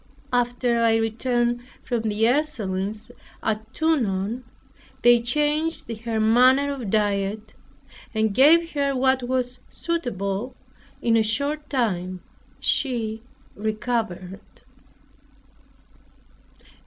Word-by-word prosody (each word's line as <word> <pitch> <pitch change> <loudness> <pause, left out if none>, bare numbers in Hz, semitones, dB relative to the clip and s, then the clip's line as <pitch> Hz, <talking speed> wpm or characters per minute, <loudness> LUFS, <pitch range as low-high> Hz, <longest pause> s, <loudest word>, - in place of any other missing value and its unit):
After 245 -1 +1
I 230 -1 +4
returned 240 +2 0 0.2
from 240 -3 -1
the 210 +1 -1
Ursulines 215 -7 -1 0.3
at 220 0 -2
Tonon, 235 -7 0 0.6
they 240 0 +7
changed 295 +1 0
her 225 0 -3
manner 255 +6 +4
of 245 -7 -5
diet, 205 0 0 0.6
and 220 -2 0
gave 330 +8 +5
her 280 -2 0
what 260 0 +2
was 250 0 -2
suitable; 245 - -3 0.5
in 230 -1 +3
a 225 - +5
short 280 +7 -1
time 185 -9 -1 0.4
she 225 -5 0 0.3
recovered. 215 -3 -3
235 Hz, 95 wpm, -24 LUFS, 215-260 Hz, 0.6 s, they